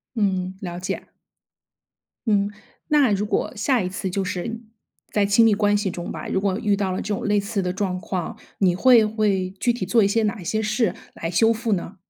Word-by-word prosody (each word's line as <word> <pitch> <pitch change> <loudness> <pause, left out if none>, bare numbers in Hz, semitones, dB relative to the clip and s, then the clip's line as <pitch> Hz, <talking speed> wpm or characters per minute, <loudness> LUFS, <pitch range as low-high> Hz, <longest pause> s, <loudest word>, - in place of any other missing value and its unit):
嗯， 190 -4 0
了 175 -2 -5
解。 180 - -4 1.2
嗯， 205 -2 +2 0.4
那 290 -6 +4
如 200 +1 0
果 205 - -1
下 245 0 +2
一 180 - -2
次 185 +1 -4
就 190 +1 -1
是 225 +6 -4 0.5
在 205 -1 +2
亲 205 +3 +5
密 225 - +5
关 205 0 +2
系 205 -2 -1
中 175 0 -6
吧， - - -6
如 190 - 0
果 195 0 0
遇 210 -3 +1
到 195 -2 -1
了 185 - -2
这 210 - -2
种 - - -4
类 205 0 +3
似 200 0 -1
的 180 0 -1
状 185 -2 -2
况， 185 -4 -4 0.2
你 185 -3 +3
会 235 +3 +6
会 210 -4 0
具 240 - +3
体 240 - -4
做 230 -2 +3
一 200 - +4
些 225 +2 +1
哪 210 0 -1
一 175 - -10
些 220 +5 0
事 215 0 +1 0.2
来 165 - -4
修 225 +6 +4
复 225 -1 -2
呢？ 185 +2 -5
205 Hz, 235 characters per minute, -23 LUFS, 185-220 Hz, 1.2 s, 会